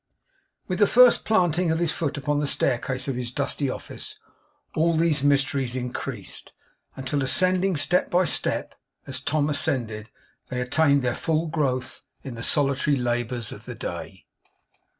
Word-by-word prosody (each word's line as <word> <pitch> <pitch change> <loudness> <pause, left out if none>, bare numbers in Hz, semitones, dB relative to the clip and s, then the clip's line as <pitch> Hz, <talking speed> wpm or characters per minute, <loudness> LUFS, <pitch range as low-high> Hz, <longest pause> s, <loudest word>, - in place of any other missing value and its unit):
With 185 0 -2
the 205 - +6
first 250 +1 +6
planting 180 -5 +2
of 160 - +1
his 170 -1 +1
foot 150 -3 -2
upon 145 +1 0
the 145 - 0
staircase 130 0 0
of 135 - -1
his 125 -1 -3
dusty 140 +2 -2
office, - - -7 0.6
all 165 +1 +2
these 160 -3 +2
mysteries 135 -3 +1
increased; 125 -1 -5 0.4
until, 135 +2 -2
ascending 185 +5 +2
step 175 +5 +2
by 180 +1 +3
step, - - -1 0.3
as - - -4
Tom 145 0 0
ascended, 115 -7 -1 0.4
they 125 - -3
attained 140 +2 +2
their 125 -1 +1
full 160 +4 0
growth 140 -6 -2 0.2
in 130 - -6
the 115 - -7
solitary 140 +2 +2
labours 120 -2 -2
of - - -10
the - - -7
day. - - -7
145 Hz, 150 wpm, -25 LUFS, 125-160 Hz, 0.6 s, the